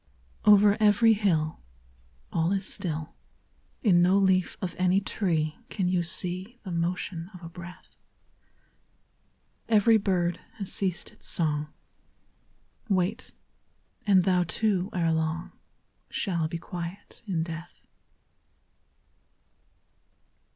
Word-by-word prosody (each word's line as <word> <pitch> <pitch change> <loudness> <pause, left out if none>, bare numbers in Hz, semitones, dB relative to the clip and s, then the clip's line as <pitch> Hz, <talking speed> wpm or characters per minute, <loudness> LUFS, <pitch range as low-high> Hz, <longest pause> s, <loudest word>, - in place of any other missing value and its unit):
I - - +4
Over 205 0 +7
every 215 +2 +5
hill 165 -7 0 0.7
All 165 +2 +1
is 195 -1 -1
still; 160 -6 -3 0.7
In 180 -6 +5
no 185 +3 +4
leaf 190 -2 +2
of 180 -3 -3
any 185 +1 +4
tree 165 -6 -1
Can 190 -4 -1
you 180 -1 +2
see 185 +6 -2
The 190 - -6
motion 170 0 -2
of 180 - -12
a 165 - -7
breath. 175 +1 -12 1.7
Every 225 +1 +5
bird 180 -4 0 0.2
has 200 -4 -3
ceased 185 -3 -1
its - - -8
song, 150 -3 0 1.2
Wait; 195 +5 0 0.8
and 190 -3 +5
thou 180 -1 +3
too, 190 +1 0
ere 170 -2 +1
long, 160 +2 -2 0.6
Shall 170 -6 -1
be 170 - -4
quiet 175 +3 -8
in 170 -5 0
death. 165 +1 -9
180 Hz, 110 wpm, -27 LUFS, 170-195 Hz, 1.7 s, Over